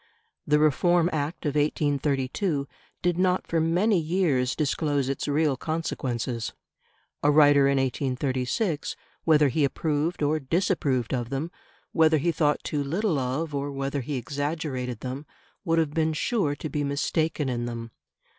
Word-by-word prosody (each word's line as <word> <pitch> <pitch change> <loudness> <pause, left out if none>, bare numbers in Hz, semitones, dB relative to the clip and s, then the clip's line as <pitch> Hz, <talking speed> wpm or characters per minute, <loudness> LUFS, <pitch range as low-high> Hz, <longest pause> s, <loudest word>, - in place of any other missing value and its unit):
The 150 - +4
Reform 170 +4 +3
Act 155 +3 -3
of 145 - 0
1832 145 +1 0 0.4
did 175 0 +1
not 185 0 +2
for 165 -1 0
many 180 +5 +2
years 155 -7 +1
disclose 145 -2 0
its 135 +1 -2
real 145 -1 +2
consequences; 125 -7 -3 0.7
a 145 - +3
writer 145 -2 +6
in 140 0 +2
1836, 135 - -1 0.3
whether 150 -3 +5
he 150 +4 +1
approved 150 +3 0
or 155 +2 +2
disapproved 140 - 0
of 120 -2 -2
them, 140 +6 -3 0.4
whether 160 -1 +4
he 170 +4 +1
thought 150 -3 +1
too 145 -2 -1
little 170 +2 0
of 135 +5 -2
or 140 0 -2
whether 140 0 -2
he 145 +3 -4
exaggerated 140 -2 -3
them, 130 +3 -5 0.4
would 165 -3 +1
have 160 -3 +1
been 160 0 +1
sure 155 -3 0
to 155 - -5
be 150 -1 -2
mistaken 150 +1 0
in 120 -2 -2
them. 115 -1 -6
145 Hz, 145 wpm, -26 LUFS, 135-160 Hz, 0.7 s, writer